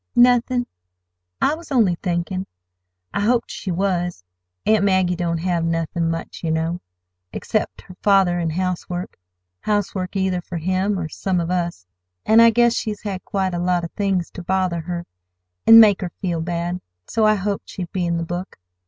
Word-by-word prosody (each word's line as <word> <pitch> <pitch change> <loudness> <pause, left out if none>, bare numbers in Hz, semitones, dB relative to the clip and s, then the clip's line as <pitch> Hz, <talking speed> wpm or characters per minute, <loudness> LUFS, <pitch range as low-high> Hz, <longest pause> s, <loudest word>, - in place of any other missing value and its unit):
"Nothin'. 245 0 +4 0.7
I 290 - +3
was 320 -1 -9
only 225 -9 +4
thinkin'. 180 +2 -2 0.7
I - - -1
hoped 235 +3 +1
she 195 - -6
was. 180 - -1 0.4
Aunt 215 -2 +4
Maggie 185 -2 +2
don't 170 -1 -1
have 170 0 -1
nothin' 165 0 -1
much, 165 +1 -5
yer 165 - -1
know, 160 +2 -1 0.5
except - - -2
her - - -12
father 190 -3 +4
an' 165 -1 0
housework—housework 180 - -4
either 190 -2 0
for 175 0 -6
him 185 +4 0
or 165 -3 -3
some 185 +3 -1
of 170 +1 -2
us. 175 - -2 0.4
An' 220 +1 +6
I 230 0 +8
guess 235 0 +4
she's 215 -3 -3
had 195 -3 -4
quite 190 -2 -1
a 175 - -2
lot 175 0 +1
of 170 - -5
things 195 -4 -1
ter 185 - -8
bother 185 -1 0
her, 175 +1 -5 0.6
an' 225 0 +11
make 210 -3 +6
her 180 - -2
feel 175 -4 -1
bad, 175 +2 -3 0.2
so 220 - 0
I 215 - +5
hoped 200 0 -3
she'd 180 -3 -6
be 180 -2 -1
in 170 0 0
the 170 - -2
book. 175 +3 -5
180 Hz, 175 wpm, -21 LUFS, 170-200 Hz, 0.7 s, an